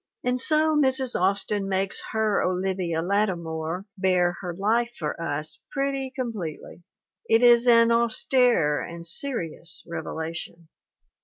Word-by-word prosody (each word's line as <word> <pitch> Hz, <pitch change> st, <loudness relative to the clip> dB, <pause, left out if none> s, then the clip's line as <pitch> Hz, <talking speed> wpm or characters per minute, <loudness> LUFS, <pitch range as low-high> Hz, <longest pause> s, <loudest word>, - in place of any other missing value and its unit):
And 250 Hz, 0 st, 0 dB
so 310 Hz, +3 st, +2 dB
Mrs. 265 Hz, -3 st, +2 dB
Austin 195 Hz, +1 st, +1 dB
makes 195 Hz, +1 st, 0 dB
her 220 Hz, -2 st, +1 dB
Olivia 180 Hz, -3 st, -1 dB
Lattimore 175 Hz, -3 st, -2 dB
bare 180 Hz, -2 st, +2 dB
her 180 Hz, -2 st, -4 dB
life 230 Hz, +5 st, +1 dB
for 155 Hz, 0 st, -4 dB
us 155 Hz, +1 st, -4 dB
pretty 275 Hz, -1 st, -2 dB
completely. 210 Hz, -, -5 dB, 0.5 s
It 225 Hz, +2 st, +4 dB
is 240 Hz, 0 st, +6 dB
an 230 Hz, -1 st, +6 dB
austere 235 Hz, -, +2 dB
and 170 Hz, 0 st, -7 dB
serious 170 Hz, -, -3 dB
revelation. 165 Hz, 0 st, -6 dB
195 Hz, 120 wpm, -25 LUFS, 170-240 Hz, 0.5 s, is